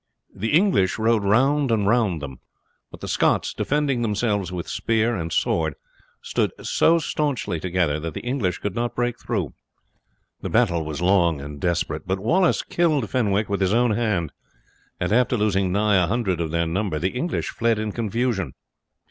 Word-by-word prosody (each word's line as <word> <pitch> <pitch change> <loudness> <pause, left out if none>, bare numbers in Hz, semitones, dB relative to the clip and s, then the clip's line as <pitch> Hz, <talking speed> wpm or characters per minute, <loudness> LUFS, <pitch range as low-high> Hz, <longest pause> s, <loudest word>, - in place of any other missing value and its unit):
The 110 +4 -3
English 165 - +3
rode 110 -1 +2
round 135 +7 +3
and 110 -3 +1
round 100 -8 +1
them, 65 -3 -7 0.5
but - - -13
the - - -5
Scots, - - +1
defending 145 -4 0
themselves 105 -4 0
with 90 -2 -5
spear 115 +1 0
and 85 -3 -4
sword, 80 -2 0 0.5
stood - - 0
so 165 +1 +3
staunchly 145 - -2
together 85 -4 0
that 80 0 -5
the - - -4
English 120 -7 -1
could 105 - -4
not 120 +2 -2
break 120 0 -1
through. 95 - -3 0.9
The - - -4
battle 95 -9 +2
was 75 +1 -5
long 90 -4 +3
and 70 +1 -8
desperate, 85 -1 -1
but 95 +1 0
Wallace 170 - +2
killed 155 -10 0
Fenwick 105 -4 +1
with 100 0 -2
his 95 +3 +2
own 120 0 +3
hand, 105 -8 0 0.7
and 90 +3 0
after 125 +1 +3
losing 100 -3 +1
nigh 100 0 +3
a - - 0
hundred 95 -5 -1
of 80 - -2
their 85 +1 0
number 90 0 -1
the 90 +5 0
English 145 +8 -2
fled 115 -1 0
in 110 0 -2
confusion. 115 - -1
105 Hz, 175 wpm, -23 LUFS, 90-120 Hz, 0.9 s, English